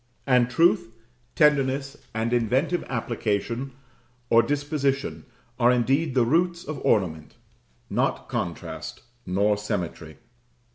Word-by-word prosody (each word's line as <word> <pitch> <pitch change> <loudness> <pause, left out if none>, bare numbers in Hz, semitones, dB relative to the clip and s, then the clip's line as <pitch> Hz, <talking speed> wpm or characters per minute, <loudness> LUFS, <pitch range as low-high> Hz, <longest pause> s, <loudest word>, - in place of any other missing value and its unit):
And 125 -2 +3
truth, 165 -5 +3 0.4
tenderness, 140 -2 +2 0.2
and 115 +2 -1
inventive 130 +9 +1
application 120 +1 -2 0.6
or 115 - +7
disposition 140 -1 -1 0.3
are 120 0 +5
indeed 135 +4 +1
the 125 -2 +4
roots 170 +6 +1
of 155 -3 -5
ornament 80 -7 0 0.5
not - - -1
contrast, - - -5 0.2
nor 100 +3 +2
symmetry. 90 -8 -4
125 Hz, 100 wpm, -25 LUFS, 110-145 Hz, 0.6 s, or